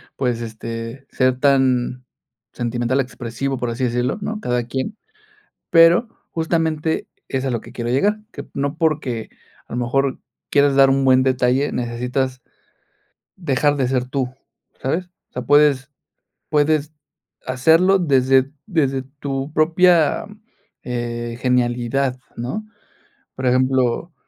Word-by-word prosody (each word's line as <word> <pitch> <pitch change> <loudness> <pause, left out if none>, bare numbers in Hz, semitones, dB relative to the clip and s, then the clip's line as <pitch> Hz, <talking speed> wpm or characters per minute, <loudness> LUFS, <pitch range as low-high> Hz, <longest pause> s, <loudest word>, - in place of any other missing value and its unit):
pues, 125 -3 -1
este, 115 +3 -7
ser 130 -1 +1
tan 130 -2 +2 0.5
sentimental 120 +2 -1
expresivo, 130 +1 -3
por 120 -1 -2
así 125 +2 -1
decirlo, 125 - -1
¿no?, 215 +1 -3
cada 125 - -1
quien. 130 - -3 0.8
Pero, 170 +7 +6 0.2
justamente, 160 -1 0 0.2
es 130 0 -2
a 135 - 0
lo 115 - -1
que 115 - -13
quiero 120 -1 -4
llegar, 205 +12 +2
que 140 - -8
no 140 +2 -2
porque, 150 -8 -1 0.4
a - - -7
lo - - -1
mejor, 135 +2 0 0.3
quieras 140 -1 +4
dar 135 0 +6
un 135 0 +2
buen 130 -1 +5
detalle, 130 +2 +2
necesitas 125 +1 -2 0.9
dejar 145 -4 +1
de 130 -3 0
ser 125 -1 0
tú, 130 -1 -2 0.5
¿sabes? 170 +7 -1 0.2
O - - -44
sea, 125 - -3
puedes 140 0 +3 0.6
puedes 150 0 +2 0.5
hacerlo 165 +9 +4
desde 135 -3 +3
desde 140 -9 0 0.2
tu 135 +1 -3
propia, 165 0 +3 0.6
eh, 120 -1 -4
genialidad, 125 +1 +1 0.2
¿no? 130 - -4 0.7
Por 130 0 -4
ejemplo, 130 +4 +1
130 Hz, 125 wpm, -20 LUFS, 125-145 Hz, 0.9 s, Pero